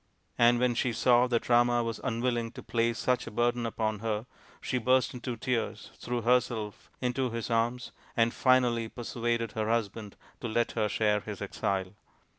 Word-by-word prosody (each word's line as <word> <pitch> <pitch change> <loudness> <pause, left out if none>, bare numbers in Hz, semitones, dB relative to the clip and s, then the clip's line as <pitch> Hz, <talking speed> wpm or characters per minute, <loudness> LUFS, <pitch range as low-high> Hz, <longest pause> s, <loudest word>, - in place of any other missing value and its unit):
" - - -43
And 120 +1 +6
when 125 -1 +2
she 120 +1 0
saw 125 +1 +4
that 120 -2 0
Rama 120 0 +4
was 115 -1 -4
unwilling 120 -2 -1
to - - -9
place 115 0 0
such 125 +2 0
a - - -3
burden 120 +1 0
upon 110 -2 -2
her, 110 0 -2 0.3
she 130 - -1
burst 130 +1 +2
into 125 -1 -5
tears, 120 -1 -2
threw 120 -1 -3
herself 120 -3 0
into 125 0 0
his 115 0 -4
arms, 120 +2 0 0.3
and 115 0 +3
finally 125 -3 +3
persuaded 115 -1 -2
her 110 0 -2
husband 110 -2 -2 0.2
to 120 - -4
let 115 +1 0
her 110 -2 0
share 105 0 +2
his 105 -2 -7
exile. 95 -1 -2
120 Hz, 175 wpm, -29 LUFS, 110-125 Hz, 0.3 s, And